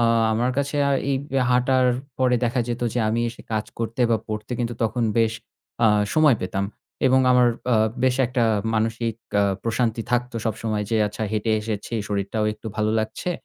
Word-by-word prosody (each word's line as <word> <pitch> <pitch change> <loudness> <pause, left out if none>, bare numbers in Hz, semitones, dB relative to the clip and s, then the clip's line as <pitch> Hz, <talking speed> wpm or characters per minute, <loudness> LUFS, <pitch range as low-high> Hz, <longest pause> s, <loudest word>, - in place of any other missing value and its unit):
আ - - +3 0.3
আমার 120 +3 +1
কাছে 140 +1 -1
অ্যা 140 - +2 0.2
এই 135 - +2 0.3
হাঁটার 125 +1 +3 0.3
পরে 125 -1 +3
দেখা 120 +1 +1
যেত 120 0 -3
যে 125 - 0
আমি 115 +2 0
এসে 120 - -10
কাজ 110 -1 0
করতে 115 +1 -3
বা 115 - +4
পড়তে 110 +2 -4
কিন্তু 120 -1 -2
তখন 115 +2 0 0.2
বেশ 115 -1 +3 0.5
আ - - +7 0.3
সময় 150 -6 +5
পেতাম 95 +1 -2 0.4
এবং 130 0 +5
আমার 125 -1 +5 0.2
আ - - +5 0.3
বেশ 130 -1 +3
একটা 125 -1 0 0.3
মানসিক 115 +1 0 0.3
আ - - +4 0.2
প্রশান্তি 115 0 0
থাকতো 125 -1 0
সব 110 - 0
সময় 110 -2 -1
যে, 115 - +2
"আচ্ছা 105 +2 -5
হেঁটে 110 +1 0
এসেছি 105 +1 -4
শরীরটাও 100 +1 -1
একটু 105 +1 -12
ভালো 110 0 +1
লাগছে 110 +11 -3
115 Hz, 185 wpm, -23 LUFS, 110-125 Hz, 0.5 s, আ